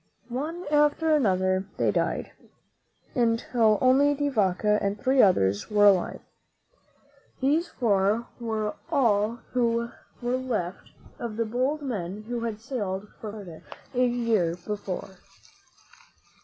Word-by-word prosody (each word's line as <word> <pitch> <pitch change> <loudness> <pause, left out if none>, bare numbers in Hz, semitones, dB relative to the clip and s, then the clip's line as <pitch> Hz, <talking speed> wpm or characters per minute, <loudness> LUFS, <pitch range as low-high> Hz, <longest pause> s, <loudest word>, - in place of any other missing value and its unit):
One 310 +8 -4
after 295 +2 +3
another 185 -7 +2
they - - +2
died, - - -1 0.8
until 230 -3 +2
only 275 +3 +4
De 290 0 0
Vaca 210 -2 +2
and 200 +1 -1
three 260 0 +4
others 100 - +3
were 205 -1 +4
alive. 195 -3 +3 1.2
These 300 +6 +2
four 215 -3 +1
were 220 -2 -2 0.2
all 235 -6 +2
who 235 -1 0 0.3
were 245 +1 0
left 220 -9 -3 0.3
of 230 -3 -5
the 230 - +1
bold 260 +7 -1
men 205 -5 -4
who 240 +2 -4
had 230 -2 -3
sailed 205 -6 -3
for 215 - -9
Florida 195 -7 -10 0.3
a 250 0 +2
year 230 -8 +1
before. 195 -2 -5
230 Hz, 120 wpm, -26 LUFS, 200-255 Hz, 1.2 s, only